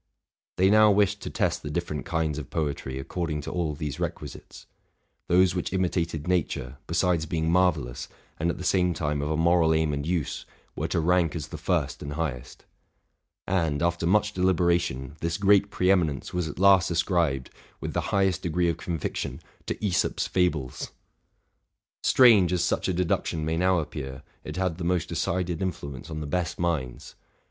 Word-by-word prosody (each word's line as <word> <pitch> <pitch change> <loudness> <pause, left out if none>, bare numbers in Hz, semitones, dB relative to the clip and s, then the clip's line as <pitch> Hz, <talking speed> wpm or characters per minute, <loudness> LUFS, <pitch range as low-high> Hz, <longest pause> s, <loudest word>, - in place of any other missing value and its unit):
They 95 +2 +4
now 110 0 +7
wished 100 0 +2
to - - -5
test - - 0
the 75 - -6
different 75 -4 -3
kinds 80 -3 -1
of 70 - -8
poetry 70 -4 -3
according 75 +2 -3
to - - -6
all 80 -4 -1
these 75 -2 -5
requisites: - - -6 0.6
those 90 0 +4
which 90 - -3
imitated 85 -4 -1
nature, 75 -7 -1
besides 85 -1 +1
being 80 0 0
marvellous, 80 -9 +1 0.3
and 85 +2 +1
at - - -2
the - - -6
same 90 -2 +2
time 75 -2 -1
of 75 - -2
a 80 - 0
moral 80 -1 +4
aim 80 -1 +1
and 70 0 -2
use, 85 -4 -2 0.3
were - - -2
to - - 0
rank 85 0 +2
as 80 - -5
the - - -6
first - - -1
and 70 0 -5
highest. 70 -6 -5 0.8
And, 85 -5 0
after 85 -1 0
much 105 +3 +2
deliberation, 85 -7 +1
this 85 +1 -1
great 100 0 +4
pre 90 -1 +2
eminence 80 -8 0
was 90 -2 -1
at 75 - -7
last 95 -1 +5
ascribed, 85 -6 0 0.3
with - - -5
the - - 0
highest 95 -3 +1
degree 85 +1 +1
of 85 - -1
conviction, 85 -4 -4 0.3
to - - -1
Asop's 90 -4 +1
fables! 80 -9 -1 1.1
Strange 110 -9 +6
as 90 -2 +1
such - - 0
a 95 - +1
deduction 85 -2 -1
may 80 +1 0
now 90 +2 +3
appear, 75 -4 -5 0.2
it - - -7
had 90 -2 -1
the - - -4
most 90 -1 0
decided 90 -2 -1
influence 70 -8 -5
on 80 -1 -5
the - - -4
best 85 +3 -2
minds. 70 -8 -2
85 Hz, 175 wpm, -26 LUFS, 75-90 Hz, 1.1 s, now